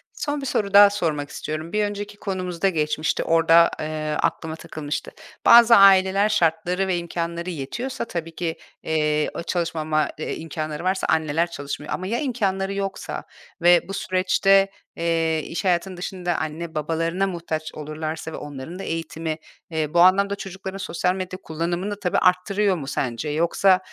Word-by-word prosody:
Son 290 -1 -3
bir 275 - -5
soru 200 -5 -1
daha 205 0 +9
sormak 155 -8 -2
istiyorum. 155 +4 -5
Bir 210 - +2
önceki 205 0 -5
konumuzda 185 -2 -1
geçmişti, 155 -2 0
orada, 165 +1 +5
eee, 155 0 -3
aklıma 160 0 -1
takılmıştı. 155 -2 -5 0.3
Bazı 235 0 +9
aileler 195 0 +6
şartları 180 0 +1
ve 180 - +1
imkânları 170 0 -4
yetiyorsa 180 - -4
tabii 165 -6 -5
ki, 165 -2 -2 0.3
eee, 150 -1 +1
ııı, - - -4
çalışmama, 155 -3 -1
eee, - - -3
imkânları 155 -1 -5
varsa 190 +1 0
anneler 160 +2 +1
çalışmıyor 145 0 -5
ama 185 - -3
ya 235 +4 -1
imkânları 195 -8 -1
yoksa 195 -1 -4 0.4
ve 175 +1 +5
bu 195 - -6
süreçte, 195 +1 +3 0.3
eee, 165 -1 +1
iş 165 +1 -4
hayatının 180 +1 0
dışında 180 -1 -3
anne 160 +1 -4
babalarına 165 +5 0
muhtaç 165 -3 -4
olurlarsa 155 +1 -5
ve - - -4
onların 145 +5 -8
da - - -5
eğitimi, 160 -1 -3 0.3
eee, 155 -2 -2
bu 170 - +3
anlamda 200 +3 +5
çocukların 190 0 -7
sosyal 180 -1 -1
medya 185 0 -5
kullanımını 175 +5 -3
tabii 180 -3 0
arttırıyor 190 +2 +2
mu 140 -6 -6
sence? 130 +1 -2
Yoksa, 170 +5 +3
170 Hz, 155 wpm, -23 LUFS, 155-195 Hz, 0.4 s, daha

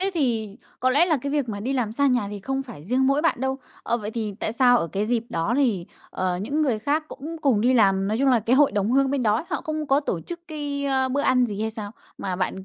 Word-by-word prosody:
thế 390 +1 0
thì 225 -8 -1 0.2
có 255 - +3
lẽ 295 +7 +4
là 320 -4 +2
cái 280 0 -3
việc 285 -5 0
mà 205 -2 -4
đi 255 +5 -2
làm 240 -5 -1
xa 280 +4 +2
nhà 245 -6 +1
thì 205 - -6
không 270 +5 -2
phải 225 - -11
riêng 255 +5 +1
mỗi 275 +2 +2
bạn 330 -7 +1
đâu. 265 0 -1 0.2
Ờ, 235 - 0
vậy 210 -1 -5
thì 215 -3 -4
tại 215 - -2
sao 245 0 +5
ở - - -1
cái 205 +2 -1
dịp 230 -1 0
đó 200 +2 -1
thì, 220 -11 +1 0.2
ờ, 185 -1 -1
những 280 +10 -1
người 245 -7 +1
khác 295 +7 0
cũng 315 +4 -7
cùng 250 -8 +3
đi 255 +3 +3
làm, 195 -3 +3
nói 215 +2 0
chung 275 +1 +3
là 245 -3 +4
cái 235 +5 +2
hội 290 -1 +5
đồng 205 +1 0
hương 275 0 +3
bên 280 -2 0
đó, 215 +4 +1
họ - - -1
không 310 -1 -3
có 275 +1 +3
tổ 185 - -2
chức 345 - -8
cái, 290 -2 -4
ơ, 265 -1 +1
bữa 275 +2 0
ăn 250 -3 +3
gì 210 -2 -5
hay 220 0 -1
sao? 215 -2 -6 0.3
Mà 185 -2 -3
bạn, 190 +1 -3
245 Hz, 285 wpm, -24 LUFS, 210-280 Hz, 0.3 s, sao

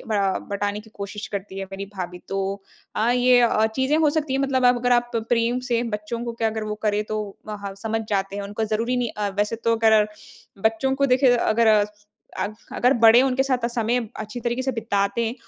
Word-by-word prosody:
अ, 200 -4 0
बटाने 205 +1 -2
की 220 +1 -17
कोशिश 200 +1 -6
करती 195 -1 -5
है 195 - -3
मेरी 195 +1 -5
भाभी। 180 -1 -5
तो 195 - -2 0.6
अ, 220 +2 +2
ये 250 0 +5
अ, 225 -2 +3
चीज़ें 265 +6 0
हो 310 -2 +3
सकती 300 -2 -1
है। 265 - +1
मतलब 265 -2 +1
आप 245 0 +6
अगर 245 +1 +1
आप 240 0 +2 0.2
प्रेम 235 +1 +2
से 235 0 +2
बच्चों 230 +3 -5
को 235 - -3
क्या 230 -1 0
अगर 220 0 -4
वो 210 0 -3
करें 210 -1 +1
तो 215 0 -3 0.3
हाँ, 200 -2 -6
समझ 225 0 -1
जाते 195 -1 -1
हैं। 205 - -3
उनको 205 +2 -3
ज़रूरी 225 +3 -1
नहीं 245 -2 -1
अ, 210 -1 -1
वैसे 210 +2 0
तो 230 0 +1
अगर 220 -2 +4 0.6
बच्चों 225 +5 +2
को 275 +1 +2
देखिए 255 -1 +4
अगर 230 -1 +2 0.7
अग 210 - -2 0.2
अगर 250 +2 +3
बड़े 230 +1 +7
उनके 265 0 +2
साथ 255 -3 0
समय 235 0 0 0.2
अच्छी 215 +3 -6
तरीके 240 +2 -1
से 265 - -1
बिताते 215 -1 0
हैं, 225 - -3
225 Hz, 215 wpm, -23 LUFS, 210-245 Hz, 0.7 s, बड़े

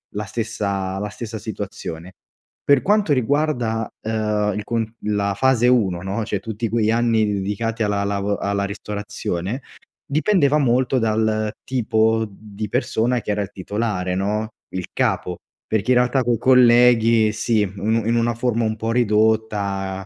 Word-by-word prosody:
la 105 - -2
stessa 100 -3 -3
la 105 0 -3
stessa 115 +1 -6
situazione. 95 -5 -6 0.5
Per 140 -2 +4
quanto 205 -5 +2
riguarda, 125 -4 0
ehm, 105 -2 0
il 105 - -3
con 115 0 -1 0.2
la 100 -1 0
fase 125 0 +3
1, 100 -9 +2
no, 100 +4 -3
cioè 105 -2 -2
tutti 110 +2 -4
quegli 110 -1 +1
anni 115 -2 +2
dedicati 105 +3 -2
alla 100 -1 0
lavo 100 0 -1
alla 100 0 -1
ristorazione, 105 +2 -4 0.4
dipendeva 155 -1 +2
molto 130 0 +2
dal 110 -1 0
tipo 110 -3 +1
di 105 +1 -8
persona 120 +1 0
che 105 - -3
era 105 0 0
il 100 - -5
titolare, 95 -2 -2
no, 105 +3 -1 0.3
il 90 -1 -3
capo. 90 -1 -1 0.3
Perché 110 +3 0
in 125 - +5
realtà 125 +1 +2
coi 120 -1 +1
colleghi, 120 -3 +5
sì, 110 -1 +1
un 110 +3 +1
in 115 - +2
una 120 0 +1
forma 120 -1 0
un 110 -1 0
po' 115 +1 -2
ridotta, 105 -4 0
110 Hz, 150 wpm, -21 LUFS, 100-120 Hz, 0.5 s, in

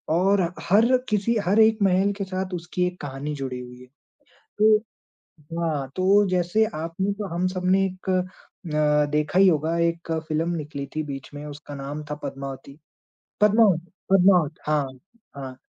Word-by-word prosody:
और 195 +2 +3 0.3
हर 210 +4 +5 0.2
किसी 215 +3 +1
हर 200 +5 +3
एक 220 0 +5
महल 195 +1 +3
के 200 - -2
साथ 185 0 -4
उसकी 175 +1 -2
एक 180 0 -7
कहानी 145 +1 -5
जुड़ी 130 -2 -4
हुई 125 0 -10
है। 125 - -14 0.7
तो 215 0 +6 0.8
हाँ, 150 -5 -1
तो 200 +2 +4
जैसे 185 +4 +2
आपने 165 +5 -2
तो 205 -1 -5
हम 180 +1 +1
सबने 185 +1 +1
एक 185 0 -6
अ, 185 +1 -4 0.5
देखा 150 +4 +1
ही 195 - +7
होगा 160 0 +1
एक 170 0 -1 0.2
फिल्म 160 +2 0
निकली 145 -3 -5
थी 155 - -1
बीच 135 -2 -7
में, 145 +1 -7
उसका 145 0 -9
नाम 145 +2 -6
था - - -1
पद्मावती 135 +1 -7 0.6
पद्मावत 210 -5 +5 0.3
पद्मावत। 180 -5 +5
हाँ, 150 -3 +1 0.5
हाँ। 130 -2 -7
175 Hz, 155 wpm, -24 LUFS, 150-195 Hz, 0.8 s, ही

